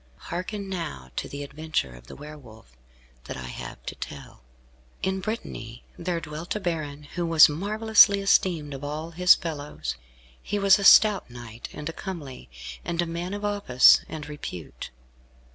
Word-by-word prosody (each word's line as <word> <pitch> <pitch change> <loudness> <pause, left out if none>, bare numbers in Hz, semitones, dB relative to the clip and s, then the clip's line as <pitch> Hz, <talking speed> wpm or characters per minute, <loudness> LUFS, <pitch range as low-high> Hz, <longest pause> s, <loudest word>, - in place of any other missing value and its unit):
Hearken, 195 - -5
now, 165 - -5
to - - -3
the 140 0 -6
adventure 145 - -3
of - - -15
the - - -10
Were 150 +1 -10
Wolf, 110 - -16 0.5
that - - -6
I 65 - -7
have 60 0 -9
to - - -4
tell. - - -9 0.6
In 190 0 0
Brittany 125 - -6
there 175 -1 -2
dwelt 155 +3 -6
a - - -1
baron 155 -6 -4
who 175 +4 -5
was 165 -2 +7
marvellously 205 +5 +4
esteemed 175 -6 +2
of 135 +1 -8
all 155 +3 -5
his 180 +2 +6
fellows. 145 - -5 0.4
He 205 - -3
was 200 0 +5
a - - -3
stout 205 - +6
knight, 120 -1 -9
and 150 - -7
a 165 - -4
comely, 160 - -8 0.3
and 170 - -4
a 175 - +2
man 170 +3 -4
of 205 0 -5
office 200 -12 +5
and 150 -2 -7
repute. 120 - -8
160 Hz, 165 wpm, -26 LUFS, 140-190 Hz, 0.6 s, was